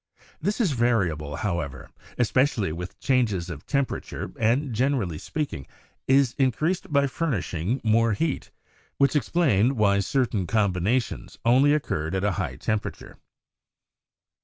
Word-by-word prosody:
This 205 +8 -1
is 205 -9 +2
variable, 95 - 0
however, 75 -10 -3 0.3
especially 125 - +2
with 90 +3 -7
changes 105 -10 +1
of 75 -3 -9
tem 140 -1 +2
perature, - - -6
and, 125 +4 +1
generally 115 - 0
speaking, 145 - -4 0.4
is 135 -2 +4
increased 150 +8 0
by 140 -1 +4
furnish 140 - -2
ing 90 - -1
more 115 0 +3
heat, 155 +7 -2 0.5
which 140 +2 +3
explained 135 - +2
why 100 -2 +3
certain 110 -4 0
combinations 105 +4 0
only 130 +5 +5
occurred 80 - -2
at 95 - -1
a 105 - +2
high 90 - -3
temperature. 110 -1 -4
115 Hz, 130 wpm, -25 LUFS, 95-140 Hz, 0.5 s, only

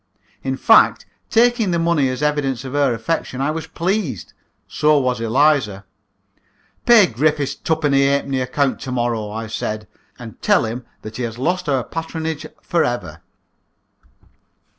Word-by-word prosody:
In - - -2
fact, - - +5 0.2
taking 235 -2 +3
the 170 - +1
money 165 -5 +2
as 130 +3 -4
evidence 140 -4 -1
of 130 - -6
her 145 -2 +2
affection, 125 +2 -3
I 140 +3 0
was 160 0 -5
pleased. 170 - -2 0.3
So 150 0 +2
was 125 -4 0
Eliza. 115 -5 +2 1.0
"Pay 235 -4 +8
Griffiths's 145 +1 0
twopenny 145 -4 +1
halfpenny 140 -1 0
account 130 +1 0
to 130 - -6
morrow," 120 -4 -1
I 110 +2 -5
said, 105 -1 -4 0.3
"and - - -11
tell - - +3
him 115 +2 -5 0.2
that 110 0 -8
he - - -4
has 115 -1 -4
lost 175 +5 -1
our 135 -3 +1
patronage 160 -1 -5 0.2
for 170 -2 +1
ever." 85 -10 -4
140 Hz, 145 wpm, -20 LUFS, 120-160 Hz, 1.0 s, Pay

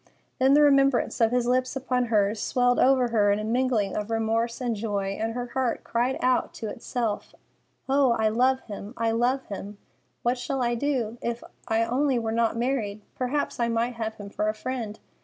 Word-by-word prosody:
Then 265 +2 +5
the 295 - +6
remembrance 275 -4 +3
of 225 - +5
his 245 0 +1
lips 255 +1 +1
upon 250 -2 0
hers 210 -2 +1
swelled 245 -1 +2
over 255 -2 +4
her 210 -3 +3
in 200 - +2
a 215 - -3
mingling 230 -3 0
of 210 +1 -3
remorse 225 +1 0
and 245 -3 -1
joy, 200 -2 -2
and 225 +1 -1
her 245 0 -4
heart 260 -3 -1
cried 245 +3 0
out 255 0 +1
to 225 - -5
itself, 230 -1 -3 0.5
"Oh, 270 -2 +4
I 220 -1 +1
love 255 +4 +2
him! 205 +2 -8
I 230 0 +1
love 245 +4 +1
him! 200 0 -7 0.5
What 245 +1 +1
shall 270 0 -2
I 240 0 +1
do? 240 -3 -1
If 235 0 -3 0.2
I 225 +1 +2
only 260 +3 +1
were 225 -1 -1
not 230 0 +1
married, 230 -4 -1
perhaps 260 +2 -2
I 235 - +2
might 235 +1 0
have 220 -1 -4
him 205 -2 -9
for 210 +1 0
a 215 - -2
friend. 225 -2 -4
235 Hz, 195 wpm, -26 LUFS, 220-255 Hz, 0.5 s, the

